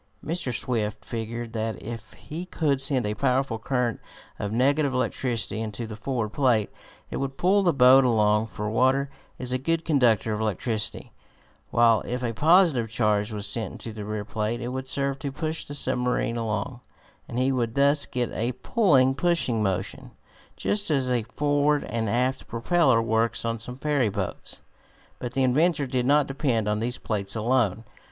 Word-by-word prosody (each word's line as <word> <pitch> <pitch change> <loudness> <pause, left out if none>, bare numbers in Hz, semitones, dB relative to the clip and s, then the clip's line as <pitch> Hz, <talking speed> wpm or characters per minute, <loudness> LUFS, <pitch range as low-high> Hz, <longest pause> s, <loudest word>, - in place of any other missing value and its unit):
Mr. 160 -4 -1
Swift 110 -2 -2
figured 115 0 -5
out 110 0 -1
that - - -13
if 115 -1 -7
he 170 +4 -8
could 145 -6 0
send 135 -4 0
a 105 - -1
powerful 130 0 0
current 125 -1 -1 0.4
of 100 - -3
negative 140 +3 +2
electricity 120 -4 -1
into 110 +1 -4
the 110 -1 -7
forward 115 -1 -2
plate 120 -4 +1 0.4
it - - -3
would 135 0 -3
pull 195 +3 +3
the 180 -3 +3
boat 135 -1 +7
along, 105 -2 +3
for 105 -1 -5
water 130 +5 +2 0.3
is 125 -1 -4
a 130 - 0
good 165 +4 -1
conductor 120 - +3
of 105 - -3
electricity, 110 +1 -2 0.6
while 115 -2 +4
if 125 +1 -3
a 115 -1 -1
positive 155 - +4
charge 105 -1 +1
was 105 -1 -3
sent 110 +2 -3
into 115 - -7
the 105 -1 -6
rear 105 0 -4
plate 110 +3 -2
it 120 0 -4
would 130 +1 -4
serve 140 0 -1
to 140 - -4
push 155 +3 -4
the 145 - -6
submarine 125 -3 0
along, 115 +2 -3 0.5
and 120 - -5
he 130 +2 +2
would 120 -3 -1
thus 140 +1 +3
get 125 -2 -2
a 120 +3 -1
pulling 135 - +3
and 135 - -3
pushing 170 -10 +1
motion, 95 -2 -2 0.5
just 205 -3 -1
as 135 -4 +1
a 120 -1 +2
forward 145 0 +2
and 115 -2 -2
aft 125 +4 0
propeller 125 0 +2
works 115 +1 0
on 115 0 -1
some 125 +3 -6
ferry 140 -5 +1
boats. - - -5 0.6
But 120 -1 -5
the 135 - +1
inventor 145 +4 +2
did 125 -1 -1
not 145 +1 +4
depend 130 -6 -1
on 105 0 0
these 120 +3 -2
plates 100 -2 -3
alone. 115 -2 +1
125 Hz, 180 wpm, -26 LUFS, 110-140 Hz, 0.6 s, boat